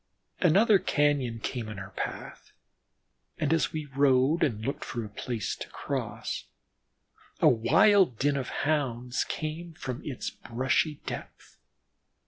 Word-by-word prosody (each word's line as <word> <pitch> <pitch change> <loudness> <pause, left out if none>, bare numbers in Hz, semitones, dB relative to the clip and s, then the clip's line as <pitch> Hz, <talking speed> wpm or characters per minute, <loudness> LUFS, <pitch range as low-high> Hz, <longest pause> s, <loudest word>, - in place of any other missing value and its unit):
Another 200 +4 +5
cañon 140 -9 +1
came 120 -4 -3
in 105 - -7
our 95 0 -8
path, - - -6 0.8
and 155 -2 +1
as 165 - +1
we 155 -1 -4
rode 140 +2 +3
and 110 -5 0
looked 140 - -2
for 120 -3 -4
a - - -8
place 110 0 -3
to - - -7
cross, - - -4 0.9
a - - +5
wild 125 - +5
din 145 +3 +2
of 135 -2 -2 0.2
Hounds 125 -5 0
came 160 +2 -5
from 130 -2 -5
its 135 -4 -4
brushy 130 +6 0
depth. - - -8
135 Hz, 130 wpm, -28 LUFS, 120-155 Hz, 0.9 s, Another